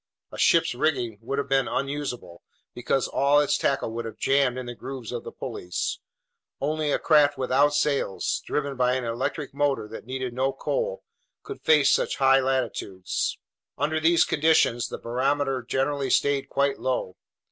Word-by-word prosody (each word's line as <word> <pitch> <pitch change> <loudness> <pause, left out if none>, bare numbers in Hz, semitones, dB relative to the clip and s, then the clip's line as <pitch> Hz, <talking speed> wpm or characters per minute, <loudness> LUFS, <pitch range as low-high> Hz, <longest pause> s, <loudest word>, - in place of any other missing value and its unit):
A - - -9
ship's - - +4
rigging 120 -6 -1
would 135 +4 -4
have 140 - -1
been 135 -1 +2
unusable, 135 -11 -4 0.3
because 125 +2 0
all 140 +1 +3
its 145 - +2
tackle 135 -4 0
would 115 +1 -4
have 110 - -7
jammed 135 -2 +2
in 130 - -5
the 120 - -6
grooves 130 -1 -7
of - - -4
the - - -8
pulleys. 90 0 -4 0.6
Only 150 +1 -1
a - - +2
craft 150 -3 +4
without 135 +3 +2
sails, 140 -9 0
driven 140 -2 -2
by 125 0 +2
an 130 - -2
electric 130 +5 -3
motor 140 -6 0
that 110 +1 -9
needed 130 -1 -4
no 135 +2 0
coal, - - -2 0.4
could 415 -1 -8
face 150 -3 +4
such - - +1
high 135 0 +5
latitudes. 125 -8 -2 0.4
Under 155 +3 0
these 165 +2 +4
conditions 150 -6 +2
the - - -6
barometer 135 +2 -1
generally 135 +3 -1
stayed 140 +1 +1
quite 140 0 0
low. 125 -8 -2
135 Hz, 165 wpm, -25 LUFS, 125-145 Hz, 0.6 s, high